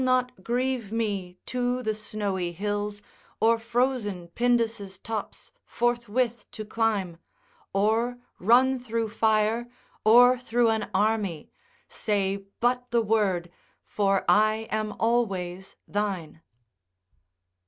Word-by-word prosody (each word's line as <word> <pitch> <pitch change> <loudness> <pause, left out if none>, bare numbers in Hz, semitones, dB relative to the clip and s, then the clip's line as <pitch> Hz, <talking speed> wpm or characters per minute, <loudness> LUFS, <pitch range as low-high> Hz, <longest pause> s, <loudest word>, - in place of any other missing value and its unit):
It - - +1
shall 255 0 +4
not 250 -5 -3
grieve 245 -3 -1
me 200 -5 -2
to 250 0 -1
the 220 - 0
snowy 205 -4 -3
hills, 205 +2 -3 0.4
Or 230 +1 +4
frozen 230 -6 -1
Pindus' 230 -3 0
tops 220 +1 -6
forthwith 240 0 -1
to 215 - -6
climb. 205 -6 -1 0.5
Or 225 +5 +1 0.2
run 255 +6 +4
through 230 -2 -2
fire, 220 +2 +1 0.3
or 245 +3 +7
through 240 -1 +2
an 220 -2 -2
army, 200 -5 0 0.4
Say 200 -2 0 0.2
but 245 +1 +1
the 235 -1 +2
word, 195 -6 +1 0.3
for 195 -2 0
I 215 +1 +3
am 215 0 -1
always 190 -6 -1
thine. 190 -6 -3
220 Hz, 110 wpm, -26 LUFS, 200-240 Hz, 0.5 s, or